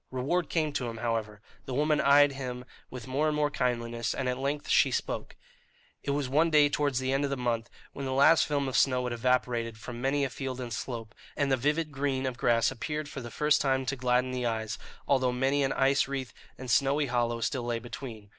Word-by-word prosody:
Reward 145 +7 -1
came 155 -3 0
to 125 -4 -2
him, 115 - -7
however. 110 -3 -2 0.3
The 130 - -3
woman 150 +2 +2
eyed 145 +1 +6
him 125 -2 -6 0.2
with 125 -2 -8
more 140 +4 0
and 155 - 0
more 150 -1 +1
kindliness, 120 -3 -1
and 135 - -2
at 125 0 -1
length 140 +2 -2
she - - +4
spoke. - - -3 0.7
It - - -6
was 140 -1 0
one 155 +6 +3
day 150 -2 +5
towards 145 -2 0
the 130 +1 0
end 135 +1 +1
of 140 - 0
the 140 - -2
month, 120 -2 -1 0.2
when 140 -1 -5
the - - -2
last 140 +5 +5
film 145 -2 0
of 130 - -3
snow 130 -2 +3
had 125 -1 -2
evaporated 120 -1 0
from 120 +1 -8
many 140 +2 +1
a 135 - -1
field 130 -1 -5
and 120 -2 -5
slope, 115 -2 -5 0.2
and 140 -2 +1
the - - +5
vivid 150 +5 0
green 135 -1 -1
of 130 -2 -2
grass 120 -1 +2
appeared 150 +4 -4
for 140 - -6
the 120 - -7
first 150 +4 +2
time 135 -1 +1
to 135 - -1
gladden 125 0 +1
the 125 -1 -3
eyes, 110 -2 -2 0.3
although 130 -2 +3
many 135 +3 +1
an 135 - +1
ice 135 +1 +2
wreath 135 -3 -4 0.2
and 130 -2 -5
snowy 140 +4 +3
hollow 120 -2 0
still 130 +2 -1
lay 120 -1 -2
between. 115 -2 -8
130 Hz, 225 wpm, -29 LUFS, 120-140 Hz, 0.7 s, eyed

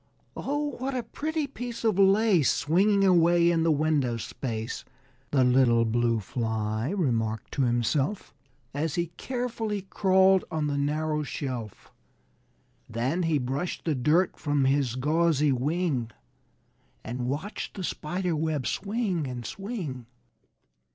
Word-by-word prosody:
"Oh, 290 +1 -2
what 265 +1 -2
a 250 - -1
pretty 310 +3 -3
piece 245 -4 -6
of 215 -4 +2
lace 195 -5 +4
Swinging 195 +6 +2
away 175 -2 +5
in 165 -1 +1
the 165 - +2
window 145 -5 +1
space!" 115 0 -5 0.5
The 135 -3 +3
little 125 -2 +4
Blue 115 0 +1
Fly 110 +1 -2
remarked 115 - -1
to 140 - -1
himself, 130 - 0 0.4
As 145 +1 -2
he 170 -1 -1
carefully 230 -5 -3
crawled 190 -1 +3
on 155 -2 -1
the 145 -1 -1
narrow 150 +2 0
shelf. 125 -7 -5 1.0
Then 125 +10 -1
he 165 -3 +2
brushed 135 +6 -3
the 160 - +1
dirt 155 +8 +2
from 145 -2 +1
his 135 -3 +1
gauzy 150 +1 +2
wing 135 -2 0 0.9
And 120 +2 -4
watched 155 +11 -4
the 190 - -5
spider 175 +1 -2
web 155 -4 -1
swing 195 - -1
and 125 -2 -6
swing. 180 - -5
155 Hz, 130 wpm, -27 LUFS, 125-190 Hz, 1.0 s, away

